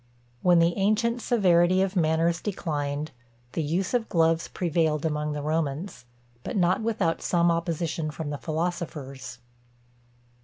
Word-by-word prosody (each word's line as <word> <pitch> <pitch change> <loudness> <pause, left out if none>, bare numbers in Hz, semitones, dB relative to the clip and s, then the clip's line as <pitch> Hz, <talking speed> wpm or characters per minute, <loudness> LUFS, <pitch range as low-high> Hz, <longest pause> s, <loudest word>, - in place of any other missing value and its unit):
When 180 -1 +5
the 170 +1 +3
ancient 220 +4 +1
severity 185 -5 +3
of 195 0 -2
manners 165 0 +2
declined, 150 -6 -3 0.4
the 165 - -2
use 175 - -1
of 240 -2 0
gloves 165 -1 +2
prevailed 160 -3 0
among 150 -1 -1
the 145 -1 -4
Romans; 155 -1 -2 0.4
but - - -3
not 180 +2 +2
without 220 -7 0
some 170 -1 +2
opposition 165 -1 -2
from 150 -1 -5
the 145 - -4
philosophers. 155 -6 -4
165 Hz, 130 wpm, -26 LUFS, 155-180 Hz, 0.4 s, When